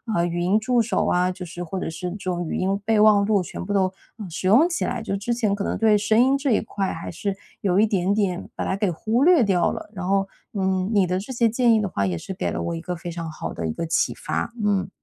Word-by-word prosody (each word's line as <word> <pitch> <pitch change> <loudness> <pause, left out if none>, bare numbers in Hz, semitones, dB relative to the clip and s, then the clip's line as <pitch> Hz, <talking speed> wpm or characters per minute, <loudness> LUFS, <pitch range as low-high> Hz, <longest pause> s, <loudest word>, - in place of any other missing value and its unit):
呃， 170 - +2
语 175 0 -2
音 185 +4 +2
助 240 +2 +2
手 215 -3 0
啊， 180 +1 +2
就 180 0 -7
是 175 +1 -7
或 180 +3 -5
者 - - -3
是 180 +2 -5
这 200 - -6
种 175 -2 -3
语 - - -2
音 195 +2 0
备 220 -1 +2
忘 210 -1 +6
录 200 -3 +2
全 - - -7
部 205 - -2
都 190 -1 +2 0.4
使 180 +3 -3
用 250 - +6
起 340 - -1
来， 245 -1 -2
就 195 - -2
之 225 +5 -2
前 215 -4 +1
可 200 0 -2
能 - - -1
对 220 -1 +4
声 215 +2 +2
音 265 +2 +4
这 275 -1 0
一 215 - +3
块， 200 -3 -3
还 165 - -6
是 195 +3 -3 0.3
有 185 -2 +1
一 215 - +6
点 195 -2 0
点 195 -4 -1
把 - - -3
它 - - 0
给 200 -1 +1
忽 220 - 0
略 345 -8 +6
掉 185 -4 +2
了， - - -7
然 185 -2 -5
后， 195 0 +2 0.3
嗯， 190 -1 0
你 200 -2 +4
的 180 +1 -1
这 215 +7 -7
些 235 -1 +3
建 235 0 +3
议 - - +3
的 200 - -1
话 100 - -1
也 90 - -2
是 190 - -6
给 - - -2
了 - - -3
我 170 - -2
一 - - -4
个 180 0 -4
非 170 +1 -7
常 165 -1 -5
好 155 - -6
的 80 - -3
一 80 - -2
个 165 - -3
启 165 - +1
发。 - - -3
嗯。 195 -2 +1
195 Hz, 305 characters per minute, -23 LUFS, 180-215 Hz, 0.4 s, 忘